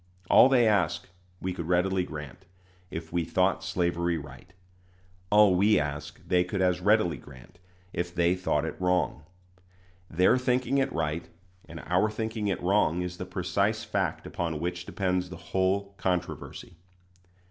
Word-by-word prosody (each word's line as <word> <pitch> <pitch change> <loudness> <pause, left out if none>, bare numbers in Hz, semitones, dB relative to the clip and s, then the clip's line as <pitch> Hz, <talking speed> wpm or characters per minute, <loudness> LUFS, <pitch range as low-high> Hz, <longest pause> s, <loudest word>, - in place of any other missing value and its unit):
All 130 - +8
they 125 -4 +4
ask 100 -7 +1 0.3
we 95 0 -3
could 85 -3 -5
readily 90 +1 +2
grant, 80 +3 -9 0.4
if 80 0 -7
we 85 -1 +1
thought 90 +3 +1
slavery 85 -1 0
right; 75 +4 -11 0.8
all 105 -2 +6
we 100 +2 +4
ask 75 0 -4
they 90 -1 +3
could 90 +2 -4
as 90 -1 +2
readily 105 -3 +3
grant, 70 +6 -15 0.3
if 85 +1 -2
they 85 0 +2
thought 90 -4 0
it 80 - -6
wrong. 90 -5 0 0.8
Their 90 +9 +3
thinking 130 +2 +1
it 135 0 0
right 80 -2 -2 0.4
and 85 -2 -9
our 90 +5 +1
thinking 110 0 -3
it 95 - -1
wrong 90 -2 +2
is 90 0 -5
the - - -5
precise - - -1
fact - - -2
upon 85 -3 -3
which 90 +2 -4
depends 90 -2 -1
the 85 - -8 0.2
whole 95 +1 +1
controversy. 90 -1 -3
90 Hz, 150 wpm, -28 LUFS, 85-95 Hz, 0.8 s, All